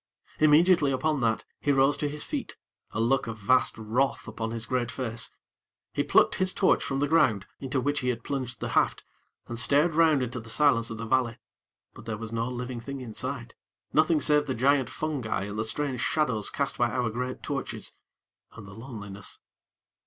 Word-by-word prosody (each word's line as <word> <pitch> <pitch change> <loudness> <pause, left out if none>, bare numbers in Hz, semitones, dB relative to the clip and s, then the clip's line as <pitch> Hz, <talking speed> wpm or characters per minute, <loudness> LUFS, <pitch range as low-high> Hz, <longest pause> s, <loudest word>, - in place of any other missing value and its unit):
Immediately 155 0 +5
upon 150 +1 0
that, 115 -1 0
he 145 - +1
rose 135 +1 +4
to 145 - -1
his 150 +1 +2
feet, - - -4 0.3
a - - -5
look 130 +3 +2
of 115 -1 -5
vast 125 +5 +2
wrath 115 +5 -1
upon 110 -1 -4
his 115 0 -3
great 120 -1 -1
face. 115 -3 -4 0.6
He - - 0
plucked - - +4
his 185 0 +1
torch 190 - +3
from 135 - -2
the 145 +1 +1
ground, 135 - +3
into 135 0 -2
which 145 +2 0
he 125 - -1
had 115 -2 -2
plunged 130 -3 -4
the - - -2
haft, - - +1 0.4
and 120 0 -4
stared 145 +8 +4
round 155 -4 +4
into 125 0 -4
the 115 0 -11
silence 115 -1 +3
of 115 - -6
the 115 - -5
valley; 120 -1 +1 0.6
but - - -13
there 115 -2 -3
was 115 0 -7
no 115 +1 -1
living 125 0 -5
thing 140 +3 -6
in 120 -4 -8
sight, 125 -1 -4 0.4
nothing 155 0 +4
save 150 0 +3
the 130 - -1
giant 135 +1 +2
fungi 140 -10 -2
and 105 +1 -5
the - - +1
strange 130 +3 -1
shadows 125 -7 +1
cast 140 -1 -3
by 120 0 +3
our 120 -2 -1
great 125 +3 -4
torches, - - -4 0.6
and 105 - -11
the 95 - -11
loneliness. 105 -4 -8
125 Hz, 195 wpm, -27 LUFS, 115-145 Hz, 0.6 s, Immediately